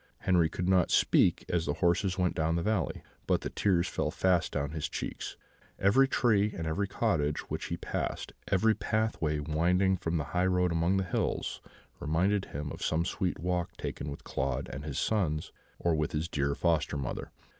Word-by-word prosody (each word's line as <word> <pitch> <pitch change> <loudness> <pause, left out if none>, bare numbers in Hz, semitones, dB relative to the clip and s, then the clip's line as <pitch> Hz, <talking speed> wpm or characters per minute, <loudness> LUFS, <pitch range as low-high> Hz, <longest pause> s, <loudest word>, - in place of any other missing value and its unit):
Henri 85 -4 +3
could 90 +2 -3
not 95 -2 +4
speak - - +3
as 85 -2 0
the 75 - 0
horses 90 +2 +1
went 90 -2 +1
down 80 +1 0
the 85 - 0
valley, 105 -6 -1 0.2
but - - +2
the - - -4
tears 90 -3 +2
fell - - -1
fast 90 -3 +1
down 70 +1 -2
his 80 -2 -3
cheeks; - - -5 0.4
every 120 +8 +4
tree 110 -6 +2
and 85 - -3
every 95 +6 0
cottage 85 -9 0
which - - -3
he - - -3
passed, - - -3 0.2
every 110 +4 +4
pathway 110 -10 0
winding 85 +6 +2
from 85 -1 -2
the 75 - -1
highroad 90 0 +2
among 85 +3 +2
the 95 - +1
hills, 90 - -2 0.4
reminded 95 +6 +1
him 75 +1 -5
of - - -8
some 80 +2 +1
sweet 90 0 -1
walk 90 +2 -2
taken 75 - -4
with 70 - -8
Claude 65 +1 -2
and 70 +2 -6
his 70 -3 -4
sons, 80 -9 0 0.3
or 85 - +1
with 75 -1 -1
his 80 +2 -1
dear 70 -3 0
foster 80 -4 +1
mother. 70 -3 -4
85 Hz, 185 wpm, -30 LUFS, 75-95 Hz, 0.4 s, not